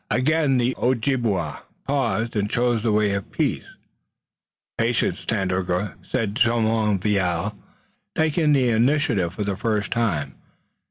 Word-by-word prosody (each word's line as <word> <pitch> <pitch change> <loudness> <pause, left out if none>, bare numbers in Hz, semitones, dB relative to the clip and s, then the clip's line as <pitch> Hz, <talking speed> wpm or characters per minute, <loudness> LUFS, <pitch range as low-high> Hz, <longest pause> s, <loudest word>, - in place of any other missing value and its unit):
Again 145 +1 +2
the 125 +1 +1
Ojibway 115 - 0 0.3
paused 120 -5 0
and 105 -1 0
chose 120 -1 +1
the 115 0 +1
way 105 -1 +2
of 100 -1 -3
peace. - - -1 1.1
"Patience, 115 0 0
Tandakora," 95 -2 -1
said 105 -3 -2
Jumonville, 105 - +1 0.6
taking 160 0 +2
the 130 -3 +3
initiative 115 - +1
for 105 - -2
the 100 -1 -2
first 105 -1 -1
time. 85 - -1
110 Hz, 115 wpm, -23 LUFS, 100-125 Hz, 1.1 s, the